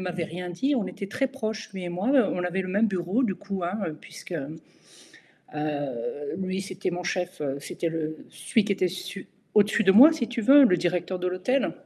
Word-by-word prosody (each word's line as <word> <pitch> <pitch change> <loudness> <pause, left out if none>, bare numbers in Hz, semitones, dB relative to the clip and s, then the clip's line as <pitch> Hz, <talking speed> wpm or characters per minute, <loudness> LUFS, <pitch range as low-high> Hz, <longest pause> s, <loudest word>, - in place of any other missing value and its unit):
m'avait 180 -2 -3
rien 180 +2 -6
dit. 265 +12 0
On 225 - 0
était 200 - -6
très 270 +7 0
proches, 220 -6 -5
lui 190 -2 -6
et - - -3
moi, 180 +6 -2 0.2
on 180 - -2
avait 180 +2 -1
le 185 - -6
même 205 +4 +2
bureau 190 +5 0
du 195 -6 0
coup, 195 -1 -5
hein, 185 +5 -2
heu, 155 -2 -5
puisque, - - -11 1.0
heu, 145 -2 -4
lui 190 0 -2
c'était 185 -1 -4
mon 175 0 -4
chef, 180 -1 -3 0.2
c'était 165 +3 -3 0.4
celui 225 - 0
qui 200 - +1
était 185 -2 +1
su 185 +2 -7 0.3
au-dessus 210 +1 +4
de 190 - +6
moi 275 +10 +9
si 275 -7 -2
tu 240 -1 -3
veux, 275 +5 +8
le 185 -8 +4
directeur 180 +1 -1
de 180 - -2
l'hôtel. 190 +10 0
185 Hz, 200 wpm, -26 LUFS, 175-215 Hz, 1.0 s, moi